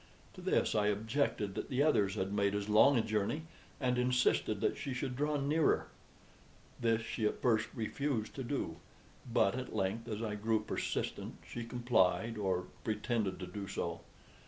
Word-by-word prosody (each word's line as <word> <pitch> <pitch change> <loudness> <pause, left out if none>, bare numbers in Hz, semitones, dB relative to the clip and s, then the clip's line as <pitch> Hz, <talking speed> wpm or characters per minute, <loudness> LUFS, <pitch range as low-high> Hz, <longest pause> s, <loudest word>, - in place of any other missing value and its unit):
To - - -10
this - - +2
I 105 -1 +2
objected 105 -1 0
that - - -4
the 135 +2 +2
others 105 -10 +3
had 95 -1 -2
made 100 -1 +2
as 105 0 -2
long 110 +6 +6
a 115 - +3
journey, 110 +9 -1 0.4
and 125 -3 +1
insisted 125 -4 +2
that - - +1
she 135 -3 -4
should 130 -1 -2
draw 150 +2 +1
nearer. 150 +3 +2 0.9
This 115 -1 +2
she 110 -1 -1
at - - -3
first 110 -3 +2
refused 120 0 -2
to 135 - -4
do; 140 +3 -2 0.5
but 110 -3 +4
at 130 -2 -5
length, 105 +3 -1
as 110 +1 -3
I 105 -2 -2
grew 110 +1 +1
persistent, 110 - -3
she 120 - -5
complied, 115 -3 +2
or 95 -2 0 0.2
pretended 105 -2 -1
to - - -3
do 100 +2 -6
so. 85 -3 -3
110 Hz, 170 wpm, -34 LUFS, 105-125 Hz, 0.9 s, long